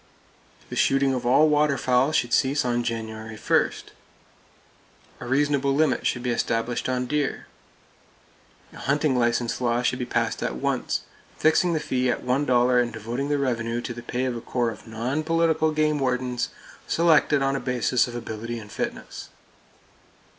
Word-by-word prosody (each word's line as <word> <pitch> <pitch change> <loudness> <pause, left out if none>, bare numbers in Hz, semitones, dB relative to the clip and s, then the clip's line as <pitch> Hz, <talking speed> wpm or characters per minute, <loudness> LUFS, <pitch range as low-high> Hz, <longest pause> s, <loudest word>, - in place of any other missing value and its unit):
The - - -4
shooting 135 0 +2
of 125 -1 -2
all 145 +5 +5
water 150 -2 +2
fowl 125 +3 +2
should 120 -6 0
cease 140 0 +2
on 120 -1 +1
January 110 -1 -5
1. - - +2 1.5
A 120 - -7
reasonable 140 +1 +1
limit 145 -5 +2
should 120 - -2
be 125 - 0
established 115 +1 -1
on 125 0 0
deer. 145 +2 -2 1.3
A - - -12
hunting 145 0 +1
license 120 0 0
law 120 0 +1
should 125 - 0
be 125 - -3
passed - - -1
at - - -2
once, 65 - -1 0.4
fixing 160 +2 +3
the 160 - +1
fee 130 -4 0
at 120 - -1
$1 125 -2 +3
and 120 -1 -2
devoting 120 +6 -4
the 145 - +1
revenue 120 -4 -1
to 120 - -5
the 120 - -8
pay 125 +2 -2
of 125 -2 -2
a 115 - -5
corps 120 -1 -1
of 110 - -12
non 120 +7 -2
political 160 -1 +2
game 155 -1 +1
wardens, 125 -2 -1 0.4
selected 155 -4 +3
on 135 0 +1
a - - -1
basis 125 -1 +1
of 120 - -8
ability 115 0 -5
and 105 -2 -10
fitness. - - -5
125 Hz, 165 wpm, -25 LUFS, 120-145 Hz, 1.5 s, all